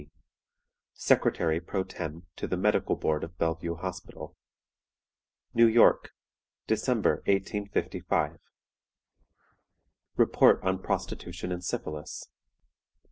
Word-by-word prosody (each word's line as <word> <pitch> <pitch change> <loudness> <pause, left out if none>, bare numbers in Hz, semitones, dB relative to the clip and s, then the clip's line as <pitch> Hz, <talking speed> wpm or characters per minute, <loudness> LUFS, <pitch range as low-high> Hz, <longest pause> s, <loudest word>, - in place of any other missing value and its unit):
D., 75 - -17 0.9
"Secretary 80 -1 +2
pro 95 +3 -2
tem. 80 -1 -7
to - - -4
the 90 - -1
Medical 105 +3 +2
Board 75 -1 -1
of 85 0 -8
Bellevue 85 +1 -1
Hospital. 90 +1 -7 1.2
"New 115 0 +6
York, 115 +1 +5 0.5
December, - - +1
1855." 100 +1 -1 1.8
"REPORT - - +5
ON 95 0 0
PROSTITUTION 90 - -4
AND 90 0 -4
SYPHILIS. 75 -3 -5
90 Hz, 90 wpm, -28 LUFS, 80-95 Hz, 1.8 s, New